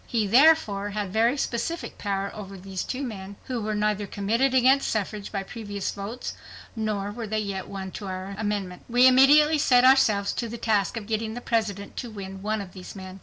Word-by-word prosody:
He, 225 -3 0
therefore, 225 -4 +4
had 205 -2 -4
very 230 +5 +3
specific 275 +6 -3
power 200 -1 -2
over 195 -2 -8
these 190 0 -5
two 270 +2 -4
men, 200 -5 -6
who 250 -3 -3
were 215 0 -2
neither 210 -1 0
committed 225 +8 +1
against 260 +2 +4
suffrage 210 -1 -3
by 195 -2 -2
previous 205 -2 -5
votes 210 +5 -6 0.4
nor 210 -2 -2
were 225 +1 -6
they 215 +1 -2
yet 200 -3 -3
won 190 -1 -6
to 200 - -7
the 190 +1 -5
amendment. 205 -4 -3
We 245 +2 +5
immediately 290 +4 +6
set 250 -3 +5
ourselves 215 -7 +4
to 235 - -3
the 235 - -6
task 215 -1 0
of 215 - -5
getting 220 +1 -2
the - - -4
President 215 -4 -2
to 245 - -4
win 195 -3 -8
one 215 +1 -1
of 185 -2 -10
these 185 +1 -10
men. 190 0 -9
210 Hz, 200 wpm, -26 LUFS, 200-235 Hz, 0.4 s, immediately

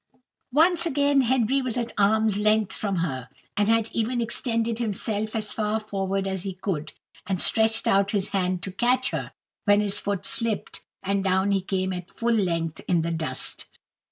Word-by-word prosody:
Once 335 +2 +5
again 285 -2 +3
Henry 260 +1 +2
was 255 -2 -2
at 235 -1 -2
arm's 210 0 +3
length 215 -1 +2
from 200 -2 -2
her, 130 -8 -2 0.3
and 205 +1 +2
had 225 -1 +3
even 235 +2 0
extended 230 -1 0
himself 215 -1 -2
as 215 -2 -2
far 215 0 0
forward 195 -2 -2
as 190 -1 -2
he 195 0 -4
could, 175 -5 -4 0.3
and 190 -2 -1
stretched 220 +3 +3
out 195 0 +3
his 200 -1 0
hand 185 -2 -1
to 190 - -3
catch 250 +6 +2
her, - - -4 0.3
when 205 -1 +5
his 205 -1 +1
foot 200 -2 -3
slipped, 230 -3 -2 0.2
and 195 0 0
down 190 +1 +2
he 195 -1 +2
came 190 0 -1
at 180 -1 -6
full 235 0 -1
length 165 -6 -1
in 170 -3 +2
the 170 - -2
dust. 155 -6 -1
205 Hz, 180 wpm, -25 LUFS, 190-230 Hz, 0.3 s, Once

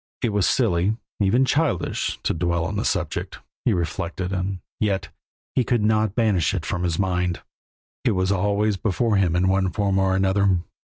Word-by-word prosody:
It 115 -4 +1
was 105 -2 +2
silly, 105 -3 +2 0.2
even 110 +6 +3
childish, 145 - 0
to - - +1
dwell 85 0 0
on 100 - -3
the 105 - -1
subject, 90 -6 -2 0.3
he - - +4
reflected, 90 +2 -2
and 95 +1 -2 0.2
yet 100 -3 0 0.4
he 130 - +2
could 120 -2 +1
not 110 -1 +2
banish 105 -7 +2
it 85 - -3
from 90 -2 -2
his 85 -2 0
mind. 90 -2 -1 0.6
It - - +2
was 95 0 +1
always 100 +1 +1
before 110 +1 +1
him, 90 -3 +2
in 90 +2 +2
one 95 0 +2
form 100 +1 0
or 95 0 +2
another. 95 -1 +2
95 Hz, 175 wpm, -23 LUFS, 90-105 Hz, 0.6 s, he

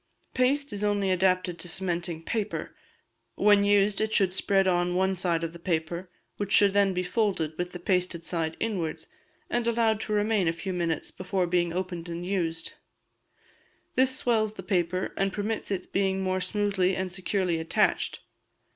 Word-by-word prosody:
Paste 275 +1 +1
is 205 0 -3
only 205 -2 +1
adapted 185 -1 +1
to - - -4
cementing 175 -2 -2
paper; 215 +3 -3 0.6
when 205 -1 +5
used 205 0 +3
it 220 0 0
should 190 -4 +3
spread 195 0 +2
on 175 -1 +1
one 190 +1 +2
side 175 -2 0
of 165 0 -3
the 170 - -10
paper, 170 +1 -2 0.3
which 205 -1 -3
should 200 -2 +6
then 200 -1 +4
be 180 0 -1
folded 180 -5 0
with 180 +2 -3
the - - -6
pasted 180 -2 -1
side 165 -2 -2
inwards, 190 -8 -2 0.4
and 240 -1 -1
allowed 225 -2 +2
to 215 - -5
remain 210 -3 +2
a 165 - +2
few 185 +3 -5
minutes 170 -2 -1
before 185 0 -1
being 175 -1 +1
opened 175 -1 -4
and 170 +1 -5
used; 165 -4 -2 1.2
this 260 0 +2
swells 220 -3 +1
the 190 - -9
paper, 185 -1 -1
and 195 -1 0
permits 215 +2 -2
its 190 -2 -2
being 190 -1 0
mere 185 0 0
smoothly 195 -2 +1
and 185 -1 -3
securely 185 -2 -1
attached. 160 0 0
185 Hz, 170 wpm, -27 LUFS, 175-205 Hz, 1.2 s, should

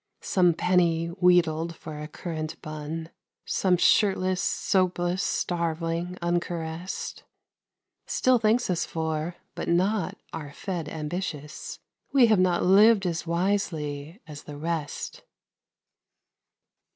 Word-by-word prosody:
Some 180 -3 +3
penny, 170 -2 +2
wheedled 170 -2 +2
for 155 -2 -8
a 150 - -5
currant 155 0 -5
bun, 155 +2 -5 0.3
Some 185 -2 +2
shirtless, 185 -1 +3
soapless 180 -1 +1
starveling, 170 +1 -1
uncaressed, 170 0 -3 0.9
Still 255 -1 +3
thanks 225 +3 +2
us 175 - 0
for, 160 +1 -3 0.2
but - - -4
not 185 +2 +1 0.2
our 150 -3 -6
fed 175 -4 -4
ambitious 155 -1 -5 0.3
We 270 -3 +6
have 215 -4 +4
not 185 -1 +3
lived 200 +2 +6
as 170 -1 -2
wisely 170 -3 -1
as 150 -2 -10
the 145 -1 -8
rest. 160 -1 -4
170 Hz, 105 wpm, -27 LUFS, 160-185 Hz, 0.9 s, We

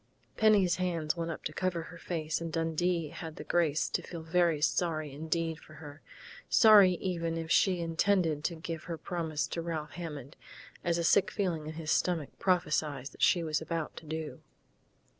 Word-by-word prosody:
Penny's 205 -5 +4
hands 170 -4 -1
went 170 -1 -3
up 165 - -6
to 155 - -4
cover 180 -2 -1
her 170 +1 -11
face, 160 -2 -3
and 165 -1 -4
Dundee 165 0 0
had 160 0 -8
the - - -7
grace 160 -4 +1
to - - -1
feel 170 -2 -8
very 165 -1 +2
sorry 155 -1 0
indeed 160 +2 -2
for 155 - -15
her 150 -1 -11 0.5
sorry 210 -5 +7
even 170 -2 -2
if 165 0 -4
she 185 -3 +3
intended 165 -2 +1
to 170 - -1
give 165 0 -6
her 170 -2 -4
promise 160 -4 -2
to 170 - -3
Ralph 160 -3 -4
Hammond, 150 -5 -7 0.5
as 170 -1 +1
a 170 - 0
sick 195 +4 +4
feeling 175 -8 -2
in 155 - -5
his 155 -1 -4
stomach 165 -6 +1
prophesied 155 -7 0
that - - -15
she 175 - +4
was 155 -2 -1
about 165 -1 -3
to 160 - -10
do.... 160 0 -5
165 Hz, 180 wpm, -31 LUFS, 155-175 Hz, 0.5 s, sorry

